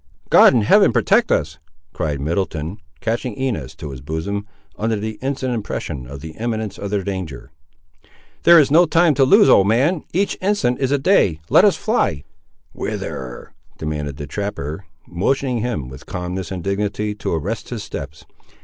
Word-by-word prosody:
"God - - +8
in 115 - +3
Heaven 200 - +5
protect 220 +4 +2
us!" 80 +1 0 0.3
cried 75 -2 -2
Middleton, 85 +3 -2 0.2
catching 115 -1 -2
Inez 110 - -3
to 75 - -7
his 65 -2 -9
bosom, 80 +8 -4 0.3
under 110 +1 -1
the 110 +1 -5
instant 130 -1 -2
impression 75 - -4
of 70 +1 -9
the 80 +1 -7
imminence 110 -2 -3
of 100 - -4
their 100 -1 -1
danger. 90 -9 -5 0.9
"There 170 0 +7
is 145 -4 +5
no 170 +3 +6
time 165 0 +4
to 135 - +3
lose, 200 +10 +6
old 95 - +6
man; 140 - +2
each 195 +3 0
instant 185 -11 +1
is 135 -2 0
a 145 - +3
day; 135 - +3
let - - +7
us - - +4
fly." 75 -2 0 0.5
"Whither?" 65 -2 -6 0.2
demanded 75 -3 -4
the 75 - -5
trapper, 95 -1 -5 0.2
motioning 125 +8 0
him, 110 - -3
with 65 +3 -12
calmness 90 -1 -4
and 90 -3 -5
dignity, 105 +2 -1
to 105 - -3
arrest 105 +8 -4
his 115 -4 -5
steps. 75 -8 -8
100 Hz, 165 wpm, -20 LUFS, 80-125 Hz, 0.9 s, God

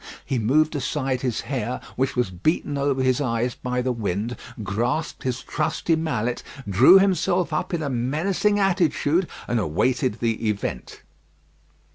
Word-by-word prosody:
He 130 - -1
moved 150 +8 +2
aside 135 -3 -1
his 120 -4 -1
hair, 125 -3 -3 0.2
which 130 +1 0
was 125 -7 0
beaten 145 - -1
over 140 -1 0
his 130 +2 +2
eyes 120 -2 0
by 125 0 -2
the 130 - 0
wind, 110 0 -2 0.3
grasped 120 +10 -2
his 130 0 -3
trusty 160 +2 0
mallet, 125 -7 -1 0.3
drew 120 - +7
himself 180 -3 +2
up 155 - -1
in 170 -3 -1
a 140 - -1
menacing 160 - +1
attitude, 175 -3 +2 0.2
and 120 - +1
awaited 120 - 0
the 115 -1 0
event. 100 -11 -4
130 Hz, 145 wpm, -24 LUFS, 120-155 Hz, 0.3 s, drew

